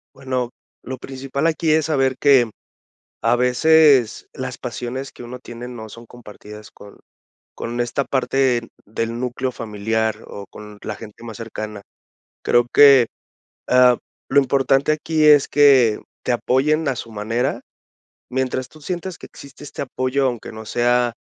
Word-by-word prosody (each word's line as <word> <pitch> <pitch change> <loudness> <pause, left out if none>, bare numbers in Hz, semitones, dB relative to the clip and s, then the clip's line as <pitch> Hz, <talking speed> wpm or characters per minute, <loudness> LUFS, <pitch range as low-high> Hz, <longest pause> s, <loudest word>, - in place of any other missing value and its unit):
Bueno, 130 -2 -3 0.3
lo 130 0 -6
principal 135 +3 -4
aquí 165 0 +1
es 155 0 +2
saber 135 -4 +1
que 135 -5 +4 0.7
a 115 +1 +4
veces 130 0 +4
las 130 -1 -6
pasiones 125 +2 -5
que - - -12
uno 125 +1 -8
tiene 120 -1 -9
no 115 -3 -8
son 115 +3 -12
compartidas 105 -2 -12
con 100 0 -15 0.6
con 120 +1 -5
esta 120 +3 0
parte 130 -3 0 0.2
del 115 +2 -3
núcleo 125 +1 -3
familiar 110 0 -2
o 100 -1 -9
con 105 -1 -12
la 110 - -5
gente 110 +2 -12
más 115 -3 -8
cercana. 110 -2 -7 0.6
Creo 120 0 +3
que, 140 -4 +7 0.6
ah, 125 -1 +5 0.3
lo 140 - +4
importante 135 +1 +2
aquí 155 0 0
es 150 -2 +6
que 135 -6 +5 0.2
te - - 0
apoyen 145 +6 +1
a 135 - 0
su 115 - -8
manera. 115 +5 -2 0.7
Mientras 130 0 -2
tú 155 +3 -17
sientas 180 +2 -4
que - - -13
existe 140 +1 -13
este 145 - -8
apoyo, 130 +1 -1
aunque 120 -4 -4
no 110 0 -9
sea 120 0 +1
125 Hz, 150 wpm, -21 LUFS, 115-135 Hz, 0.7 s, que